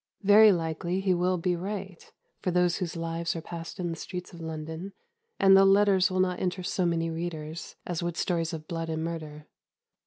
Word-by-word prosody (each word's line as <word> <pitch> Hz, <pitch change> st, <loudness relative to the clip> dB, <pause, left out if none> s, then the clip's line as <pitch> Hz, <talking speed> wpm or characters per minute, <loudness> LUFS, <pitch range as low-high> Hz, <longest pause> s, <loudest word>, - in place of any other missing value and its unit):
Very 210 Hz, +2 st, +8 dB
likely 170 Hz, +1 st, -1 dB
he 195 Hz, -1 st, +2 dB
will 180 Hz, +1 st, +1 dB
be 180 Hz, +1 st, 0 dB
right 190 Hz, 0 st, -6 dB, 0.3 s
for -, -, -1 dB
those 180 Hz, 0 st, +2 dB
whose 175 Hz, -3 st, -3 dB
lives 165 Hz, 0 st, -2 dB
are 165 Hz, -, -4 dB
passed 170 Hz, +1 st, -7 dB
in 175 Hz, -2 st, -2 dB
the -, -, -3 dB
streets 180 Hz, +2 st, -7 dB
of 170 Hz, -, -10 dB
London, 160 Hz, +4 st, -6 dB, 0.5 s
and 195 Hz, 0 st, +7 dB
the 195 Hz, -, +7 dB
letters 195 Hz, -1 st, +5 dB
will 185 Hz, 0 st, -1 dB
not 180 Hz, -1 st, +1 dB
interest 180 Hz, 0 st, -2 dB
so 180 Hz, -2 st, +1 dB
many 165 Hz, -1 st, 0 dB
readers 160 Hz, -1 st, -5 dB
as 175 Hz, -2 st, -3 dB
would 175 Hz, 0 st, -3 dB
stories 165 Hz, -2 st, 0 dB
of 155 Hz, -2 st, -7 dB
blood 165 Hz, -1 st, -4 dB
and 160 Hz, 0 st, -2 dB
murder. 155 Hz, -2 st, -6 dB
175 Hz, 195 wpm, -28 LUFS, 165-185 Hz, 0.5 s, Very